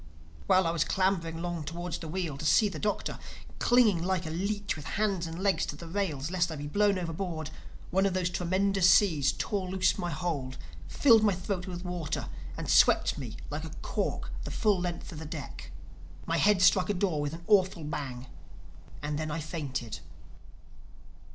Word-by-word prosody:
While 185 -1 +5
I 165 - +2
was 165 -2 +1
clambering 185 -4 0
along 170 -2 -3
towards 170 +2 -4
the 165 - -7
wheel 170 -3 -3
to - - -5
see 210 +7 +5
the - - -7
Doctor, 210 -1 -2 0.4
clinging 230 -8 +4
like 185 -1 0
a 155 - -4
leech 200 +4 -2
with 155 -1 -9
hands 200 -5 0
and 165 0 -6
legs 200 -2 +2
to - - -4
the 170 - -9
rails 165 -5 -2
lest 180 -2 +1
I - - -4
be 145 0 -6
blown 200 +5 +2
overboard, 165 -3 -4 0.4
one 190 +2 +3
of 190 - -2
these 180 -1 0
tremendous 185 +1 +2
seas 155 -11 +5
tore 195 -3 -2
loose 190 +2 +1
my 175 -2 -2
hold, 145 -5 -3 0.3
filled 230 -6 +5
my 205 -3 +3
throat 185 0 -3
with 180 0 -6
water 175 -4 -3 0.3
and - - -5
swept - - +4
me - - -6
like - - -3
a - - -6
cork - - -2
the - - -5
full 210 -4 +2
length 175 -1 -4
of 155 - -7
the 160 - -7
deck. 145 - -7 0.6
My 165 - 0
head 200 0 +4
struck 185 +1 +5
a 205 - +1
door 180 -5 0
with 145 +1 -2
an 170 +1 -8
awful 190 -5 +3
bang. 135 -4 -5 0.8
And 145 0 -2
then 155 0 -2
I 160 +2 -2
fainted. 145 -7 -4
175 Hz, 190 wpm, -29 LUFS, 155-195 Hz, 0.8 s, While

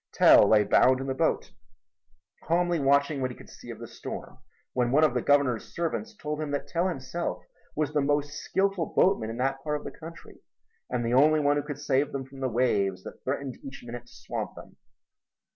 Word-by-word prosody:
Tell 100 - +7
lay 105 -1 +6
bound 130 +5 +4
in 135 - -4
the 135 - -1
boat, 160 +4 0 0.9
calmly 175 +1 +1
watching 140 +1 +2
what 130 - 0
he 125 - -9
could - - -14
see - - -13
of - - -7
the - - -8
storm, - - -8 0.3
when 125 -1 +1
one 150 +4 +4
of 150 -5 +4
the 125 - 0
Governor's 140 -5 +1
servants 210 +7 -3
told 150 -4 -4
him 155 - -3
that 145 0 -3
Tell 170 +5 0
himself 170 +1 -4 0.3
was 150 -1 -1
the 150 - +2
most 145 +1 0
skilful 195 +1 -1
boatman 115 - +3
in 115 - -5
that 135 +1 -1
part 150 -1 -1
of - - -11
the - - -6
country 165 0 -12 0.5
and 120 -1 -1
the 115 - 0
only 155 +4 +5
one 145 0 +3
who - - +1
could 145 -1 -6
save 145 -1 0
them 135 -1 -3
from 135 +1 -13
the 130 -1 -1
waves 100 -6 +1
that - - -11
threatened 135 -1 -3
each 135 0 -9
minute 120 0 -8
to - - -19
swamp 115 -3 -5
them. - - -13
140 Hz, 210 wpm, -27 LUFS, 125-155 Hz, 0.9 s, Tell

